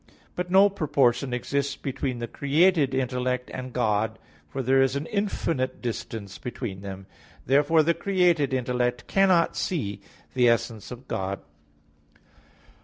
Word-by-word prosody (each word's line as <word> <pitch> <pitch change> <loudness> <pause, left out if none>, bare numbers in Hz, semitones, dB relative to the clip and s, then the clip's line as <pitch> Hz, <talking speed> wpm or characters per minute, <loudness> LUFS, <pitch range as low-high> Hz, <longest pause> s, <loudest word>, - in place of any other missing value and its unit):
But 180 0 -3
no 195 +2 +7
proportion 140 -9 +1
exists 140 +3 -1
between 130 -2 -3
the 120 0 -4
created 145 +1 +2
intellect 125 -1 -1
and 130 0 -6
God; 110 -2 0 0.3
for 135 - -4
there 135 +2 +4
is 135 0 +2
an 140 +2 -2
infinite 165 -9 -1
distance 110 -4 -5
between 115 -6 -5
them. 95 -1 -7 0.4
Therefore 150 +4 +4
the 170 +2 +3
created 175 -7 +2
intellect 125 -1 -1
cannot 190 -4 +3
see 105 - -2 0.3
the 125 -2 +4
essence 115 -2 -1
of 125 +1 -10
God. 95 +1 -3
130 Hz, 130 wpm, -26 LUFS, 120-155 Hz, 0.4 s, no